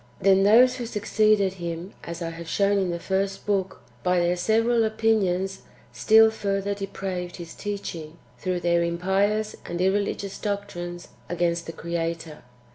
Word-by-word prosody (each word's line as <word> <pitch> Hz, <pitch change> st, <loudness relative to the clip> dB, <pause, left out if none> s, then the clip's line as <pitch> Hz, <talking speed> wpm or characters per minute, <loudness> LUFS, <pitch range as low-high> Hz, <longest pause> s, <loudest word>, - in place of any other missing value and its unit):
Then 195 Hz, 0 st, +5 dB
those 245 Hz, +5 st, +6 dB
who 240 Hz, -2 st, -4 dB
succeeded 210 Hz, -2 st, +2 dB
him, 170 Hz, +2 st, -5 dB
as 170 Hz, +1 st, -6 dB
I 165 Hz, -, -3 dB
have 165 Hz, 0 st, -9 dB
shown 200 Hz, 0 st, +2 dB
in 190 Hz, -2 st, 0 dB
the 170 Hz, -, -2 dB
first 195 Hz, +2 st, -2 dB
book,^ 195 Hz, -2 st, 0 dB, 0.2 s
by 180 Hz, 0 st, +2 dB
their 175 Hz, +1 st, +2 dB
several 225 Hz, +5 st, +2 dB
opinions, 205 Hz, -4 st, +1 dB, 0.3 s
still 220 Hz, -, +6 dB
further 200 Hz, -2 st, -1 dB
depraved 190 Hz, -3 st, -5 dB
[his 170 Hz, -2 st, -9 dB
teaching] 170 Hz, -6 st, -6 dB, 0.3 s
throuMi 180 Hz, -1 st, -1 dB
their 170 Hz, 0 st, +3 dB
impious 195 Hz, +5 st, 0 dB
and 175 Hz, 0 st, -4 dB
irreligious 200 Hz, +1 st, 0 dB
doctrines 190 Hz, -4 st, -4 dB, 0.2 s
a^rainst 170 Hz, -1 st, 0 dB
the -, -, -5 dB
Creator. 165 Hz, -1 st, -4 dB
190 Hz, 145 wpm, -25 LUFS, 175-205 Hz, 0.3 s, those